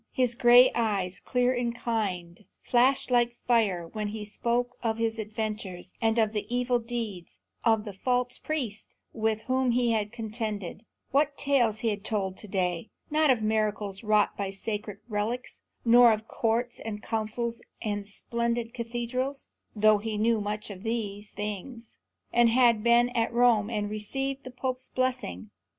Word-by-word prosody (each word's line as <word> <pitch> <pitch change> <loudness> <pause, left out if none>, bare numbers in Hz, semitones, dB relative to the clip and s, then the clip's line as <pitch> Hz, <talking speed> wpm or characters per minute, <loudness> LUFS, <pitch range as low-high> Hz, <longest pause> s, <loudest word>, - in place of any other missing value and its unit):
His 250 -2 +1
gray 245 +1 +7
eyes, 195 -5 0
clear 250 0 +1
and 240 -1 -1
kind, 195 -6 -3 0.2
flashed 255 +2 +3
like 240 -1 +3
fire 215 -9 +1
when 210 +4 -4
he 210 0 -5
spoke 240 +3 -1
of 225 -2 0
his 225 0 -1
adventures, 215 -4 -4
and 225 0 +2
of 220 -1 +2
the 210 - -3
evil 245 0 +1
deeds 225 -6 -5 0.3
of 225 -2 +3
the 205 - -6
false 245 +5 0
priests 245 -10 -4 0.2
with 220 -1 0
whom 260 +1 +1
he 240 -1 +2
had 210 -2 0
contended. 220 -4 -5 0.3
What 285 +1 +2
tales 240 -6 +2
he 230 - +1
had 205 -2 -3
told 195 -4 -2
that 210 - -11
day! 180 0 -1 0.2
Not 310 0 +3
of 240 -4 +3
miracles 215 -2 -1
wrought 210 -1 +3
by 200 -1 -3
sacred 210 +1 -4
relics; 225 +3 -3 0.2
nor 240 0 +8
of 215 0 -2
courts 235 +2 -1
and 210 -1 -6
councils 230 +1 -2 0.2
and 205 -2 -3
splendid 235 +2 -2
cathedrals; 240 +3 -3 0.3
though 215 0 +5
he 215 0 -3
knew 225 0 +2
much 210 +1 -3
of 190 -2 -9
these 210 -2 -3
things, 210 +3 -6 0.4
and 240 -1 +5
had 235 -2 +4
been 235 +1 +4
at 230 -2 0
Rome 235 -3 +4
and 210 -3 -1
received 270 +6 -3
the - - -6
Pope's 255 0 -3
blessing. 110 - -2
225 Hz, 160 wpm, -28 LUFS, 210-245 Hz, 0.4 s, nor